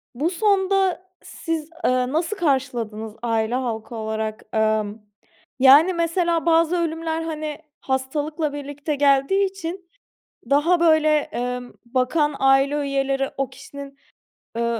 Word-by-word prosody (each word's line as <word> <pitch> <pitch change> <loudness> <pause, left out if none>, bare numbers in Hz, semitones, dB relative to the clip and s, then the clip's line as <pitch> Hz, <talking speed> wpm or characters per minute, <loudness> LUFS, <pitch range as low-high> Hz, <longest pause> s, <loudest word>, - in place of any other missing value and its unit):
bu 295 +7 0
sonda 385 -1 +1 0.2
siz, 325 -2 -4 0.2
ııı, 255 +1 +1
nasıl 335 +6 -1
karşıladınız 240 - -1
aile 225 0 0
halkı 235 -2 -4
olarak? 220 0 -4
Emm, 215 -1 0 0.6
yani 285 +8 +7
mesela 335 0 0
bazı 335 +1 +3
ölümler, 325 -1 -2
hani, 310 -2 -4 0.2
hastalıkla 290 +4 -2
birlikte 290 +1 -4
geldiği 280 +7 +3
için 370 -1 -6 0.6
daha 310 +5 +3
böyle, 315 -2 +4
emm, 250 -2 -5
bakan 265 +5 0
aile 270 +1 +4
üyeleri 275 -1 -1
o 275 -1 -1
kişinin, 280 -1 -11 0.6
ııı, 235 0 0
285 Hz, 115 wpm, -22 LUFS, 255-330 Hz, 0.6 s, yani